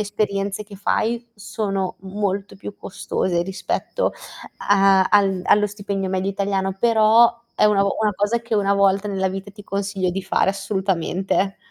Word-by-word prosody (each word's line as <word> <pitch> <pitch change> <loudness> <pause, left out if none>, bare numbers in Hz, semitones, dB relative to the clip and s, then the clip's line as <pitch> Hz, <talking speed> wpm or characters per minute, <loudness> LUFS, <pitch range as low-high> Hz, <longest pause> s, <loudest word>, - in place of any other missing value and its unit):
esperienze 205 -1 -2
che 200 -1 -12
fai 230 +4 -1
sono 200 -3 -3
molto 195 0 -3
più 200 +1 -9
costose 175 -2 -2
rispetto 190 - -2 0.6
a 195 -1 +5
al 195 -3 +2
allo 210 0 +4
stipendio 200 -2 -4
medio 190 +1 -1
italiano, 195 -1 -1
però 230 +1 +4
è - - +2
una 210 -2 +4
o 200 - -1
una 210 -1 +2
cosa 205 +4 0
che 230 -1 -3
1 200 -1 +2
volta 200 +1 +2
nella 190 -1 0
vita 195 +2 -6
ti 205 0 -14
consiglio 195 -2 -2
di 195 +2 -4
fare 190 0 +1
assolutamente. 195 -1 -1
200 Hz, 155 wpm, -21 LUFS, 195-210 Hz, 0.6 s, a